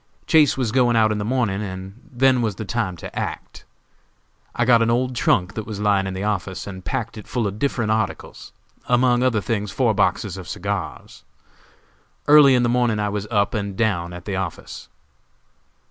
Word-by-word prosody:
Chase 150 Hz, -4 st, +4 dB
was 125 Hz, -5 st, -1 dB
going 120 Hz, -1 st, +3 dB
out 110 Hz, -1 st, +4 dB
in 105 Hz, -, -1 dB
the -, -, -2 dB
morning, 110 Hz, -4 st, 0 dB
and 95 Hz, +2 st, -7 dB
then 130 Hz, 0 st, +3 dB
was 110 Hz, -4 st, -1 dB
the 110 Hz, -, -6 dB
time 100 Hz, -3 st, -2 dB
to -, -, -9 dB
act. -, -, -6 dB, 0.9 s
I 120 Hz, -, +1 dB
got 120 Hz, -1 st, +5 dB
an 115 Hz, -, +2 dB
old 125 Hz, +2 st, 0 dB
trunk 90 Hz, -5 st, +1 dB
that 110 Hz, -1 st, -6 dB
was 105 Hz, -3 st, -6 dB
lying 100 Hz, -2 st, +2 dB
in 95 Hz, -, -5 dB
the 95 Hz, -, -4 dB
office, 100 Hz, -3 st, -3 dB
and 95 Hz, -2 st, -8 dB
packed 115 Hz, -2 st, -4 dB
it 105 Hz, -, -12 dB
full 120 Hz, -3 st, -2 dB
of 100 Hz, +1 st, -4 dB
different 115 Hz, -5 st, 0 dB
articles, 110 Hz, -2 st, -3 dB, 0.4 s
among 125 Hz, 0 st, +3 dB
other 125 Hz, -4 st, +2 dB
things 105 Hz, +1 st, -2 dB
four -, -, +1 dB
boxes -, -, 0 dB
of -, -, -9 dB
cigars. -, -, -5 dB, 1.0 s
Early 145 Hz, -3 st, +7 dB
in 125 Hz, -, +2 dB
the -, -, +2 dB
morning 120 Hz, -2 st, +1 dB
I 105 Hz, 0 st, 0 dB
was 105 Hz, 0 st, -4 dB
up 100 Hz, -3 st, +1 dB
and 100 Hz, -3 st, -3 dB
down 90 Hz, -6 st, 0 dB
at 90 Hz, -1 st, -9 dB
the 100 Hz, -, -3 dB
office. 95 Hz, -2 st, -6 dB
110 Hz, 190 wpm, -22 LUFS, 100-120 Hz, 1.0 s, Early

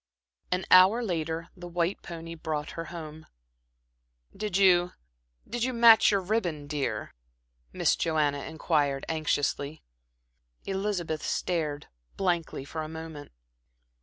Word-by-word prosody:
An 180 Hz, +1 st, 0 dB
hour 190 Hz, +6 st, +7 dB
later 165 Hz, -4 st, -2 dB
the 175 Hz, -1 st, -9 dB
white 175 Hz, +2 st, -1 dB
pony 165 Hz, -1 st, -8 dB
brought 155 Hz, -2 st, -4 dB
her 165 Hz, -, -5 dB
home. 155 Hz, -1 st, -9 dB, 1.1 s
"Did 210 Hz, -3 st, -2 dB
you 180 Hz, -2 st, +4 dB, 0.5 s
did 240 Hz, -1 st, -3 dB
you 255 Hz, +1 st, 0 dB
match 230 Hz, -2 st, +7 dB
your 200 Hz, -2 st, +2 dB
ribbon, 180 Hz, -7 st, -1 dB
dear?" 145 Hz, -2 st, -3 dB, 0.6 s
Miss -, -, +2 dB
Joanna 150 Hz, -3 st, 0 dB
inquired 150 Hz, -4 st, 0 dB
anxiously. 155 Hz, -1 st, -1 dB, 0.8 s
Elizabeth 190 Hz, -5 st, -2 dB
stared 155 Hz, -5 st, -2 dB, 0.3 s
blankly 175 Hz, -7 st, -1 dB
for 160 Hz, +3 st, -5 dB
a 155 Hz, -, -5 dB
moment. 160 Hz, -2 st, -8 dB
165 Hz, 115 wpm, -28 LUFS, 155-185 Hz, 1.1 s, hour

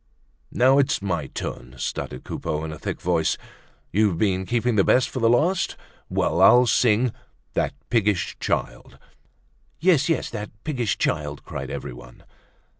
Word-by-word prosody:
"Now, 130 Hz, +3 st, +4 dB
it's 140 Hz, -, +2 dB
my 85 Hz, -7 st, -2 dB
turn," 65 Hz, -1 st, -6 dB
stuttered -, -, -4 dB
Coupeau, 75 Hz, 0 st, -3 dB
in 80 Hz, -, -4 dB
a 75 Hz, -, -8 dB
thick -, -, -4 dB
voice. 85 Hz, -3 st, +1 dB, 0.5 s
"You've 100 Hz, -3 st, +2 dB
been 95 Hz, -1 st, 0 dB
keeping 120 Hz, 0 st, +1 dB
the 100 Hz, -, +4 dB
best 125 Hz, +5 st, +3 dB
for 130 Hz, -, -4 dB
the 115 Hz, -1 st, +3 dB
last. 165 Hz, +10 st, +2 dB, 0.3 s
Well! 85 Hz, -, +1 dB
I'll 125 Hz, +6 st, +7 dB
sing 115 Hz, -1 st, +3 dB
you 125 Hz, -, +1 dB, 0.4 s
'That -, -, -1 dB, 0.2 s
Piggish 105 Hz, -5 st, +1 dB
Child.'" -, -, -3 dB, 0.8 s
"Yes, 160 Hz, -3 st, +3 dB
yes, 165 Hz, -, 0 dB
'That 105 Hz, -2 st, -5 dB
Piggish 125 Hz, -8 st, -1 dB
Child,'" 75 Hz, -2 st, -2 dB
cried -, -, -6 dB
everyone. -, -, -8 dB
105 Hz, 150 wpm, -24 LUFS, 85-125 Hz, 0.8 s, I'll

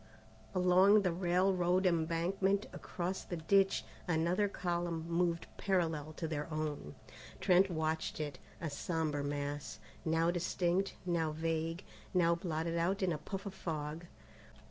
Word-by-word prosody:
Along 185 Hz, +3 st, +6 dB
the 180 Hz, -, +2 dB
railroad 180 Hz, +1 st, +2 dB
embankment 180 Hz, +4 st, +1 dB
across 180 Hz, +1 st, -4 dB
the 175 Hz, -, -5 dB
ditch, 195 Hz, +4 st, +3 dB, 0.2 s
another 175 Hz, +4 st, +2 dB
column 175 Hz, -3 st, -2 dB
moved 170 Hz, 0 st, +1 dB
parallel 160 Hz, -6 st, 0 dB
to 160 Hz, +1 st, -4 dB
their 155 Hz, 0 st, -3 dB
own. 150 Hz, -, -3 dB, 0.4 s
Trent 190 Hz, +1 st, +5 dB
watched 160 Hz, -2 st, -1 dB
it, 145 Hz, -4 st, -4 dB, 0.2 s
a 165 Hz, -4 st, -3 dB
sombre 155 Hz, -1 st, -1 dB
mass, 145 Hz, -3 st, -3 dB, 0.3 s
now 165 Hz, +1 st, +2 dB
distinct, 175 Hz, +2 st, 0 dB
now 170 Hz, -3 st, +1 dB
vague, 165 Hz, +2 st, -2 dB, 0.3 s
now 170 Hz, -2 st, +5 dB
blotted 170 Hz, -1 st, -2 dB
out 190 Hz, +4 st, +1 dB
in 185 Hz, -, +2 dB
a 150 Hz, -, -4 dB
puff 195 Hz, +5 st, -6 dB
of 200 Hz, -, -5 dB
fog. 160 Hz, -2 st, -4 dB
170 Hz, 130 wpm, -34 LUFS, 160-185 Hz, 0.4 s, Along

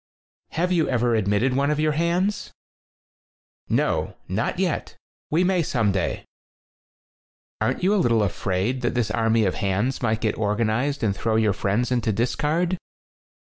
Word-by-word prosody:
"Have 180 Hz, +3 st, 0 dB
you 170 Hz, -3 st, +2 dB
ever 120 Hz, -1 st, +1 dB
admitted 110 Hz, +4 st, +1 dB
one 140 Hz, +1 st, +2 dB
of 150 Hz, 0 st, 0 dB
your 155 Hz, 0 st, +2 dB
hands?" 170 Hz, +6 st, 0 dB, 1.2 s
"No, -, -, 0 dB
not -, -, -1 dB
yet. -, -, -2 dB, 0.3 s
We 165 Hz, +4 st, +2 dB
may 185 Hz, -1 st, +2 dB
some 115 Hz, -9 st, +1 dB
day." 95 Hz, -2 st, -2 dB, 1.4 s
"Aren't -, -, 0 dB
you 195 Hz, +3 st, +3 dB
a 205 Hz, -, +3 dB
little 115 Hz, -5 st, +3 dB
afraid 100 Hz, +6 st, -1 dB
that 120 Hz, 0 st, -1 dB
this 120 Hz, -3 st, 0 dB
army 115 Hz, -1 st, +2 dB
of 95 Hz, -, +1 dB
hands 100 Hz, +5 st, -1 dB
might 110 Hz, -2 st, 0 dB
get 110 Hz, -2 st, -1 dB
organized 110 Hz, +6 st, 0 dB
and 100 Hz, -3 st, +1 dB
throw 110 Hz, +2 st, -1 dB
your 110 Hz, -2 st, +3 dB
friends 105 Hz, +7 st, -1 dB
into 120 Hz, -3 st, +1 dB
the -, -, -4 dB
dis 120 Hz, +3 st, 0 dB
card 170 Hz, +4 st, 0 dB
120 Hz, 160 wpm, -24 LUFS, 110-150 Hz, 1.4 s, you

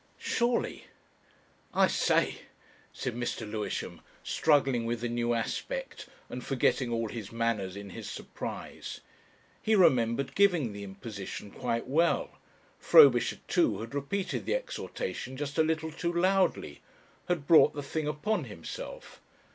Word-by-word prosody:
Surely! 240 Hz, 0 st, 0 dB, 0.9 s
"I -, -, +6 dB
say!" -, -, +2 dB, 0.5 s
said 125 Hz, -, -4 dB
Mr. 120 Hz, -2 st, -3 dB
Lewisham, 105 Hz, 0 st, -4 dB, 0.2 s
struggling 135 Hz, -5 st, +2 dB
with, 115 Hz, 0 st, -2 dB
the 120 Hz, -, -1 dB
new 120 Hz, 0 st, 0 dB
aspect -, -, -4 dB, 0.2 s
and 125 Hz, -, -6 dB
forgetting 130 Hz, -2 st, +1 dB
all 115 Hz, -1 st, 0 dB
his 110 Hz, -4 st, -7 dB
manners 115 Hz, -5 st, -1 dB
in 100 Hz, -1 st, -8 dB
his -, -, -7 dB
surprise.... -, -, -7 dB, 0.6 s
He 220 Hz, -, +3 dB
remembered 130 Hz, -, +3 dB
giving 175 Hz, -, +3 dB
the 100 Hz, 0 st, -7 dB
imposition 100 Hz, 0 st, -7 dB
quite 115 Hz, -2 st, -2 dB
well: 170 Hz, -, +1 dB, 0.4 s
Frobisher 465 Hz, -2 st, +6 dB, 0.2 s
ii. 335 Hz, -4 st, +3 dB
had 115 Hz, +3 st, -7 dB
repeated 145 Hz, +8 st, -2 dB
the -, -, +2 dB
exhortation -, -, -4 dB
just 145 Hz, +2 st, -3 dB
a -, -, +6 dB
little 160 Hz, 0 st, -1 dB
too 170 Hz, +2 st, -2 dB
loudly 185 Hz, -, +1 dB, 0.5 s
had 175 Hz, -5 st, -1 dB
brought 160 Hz, -1 st, +6 dB
the 145 Hz, -, -4 dB
thing 150 Hz, +2 st, -3 dB
upon 155 Hz, +3 st, -1 dB
himself. 105 Hz, -8 st, -8 dB
135 Hz, 130 wpm, -30 LUFS, 115-170 Hz, 0.9 s, I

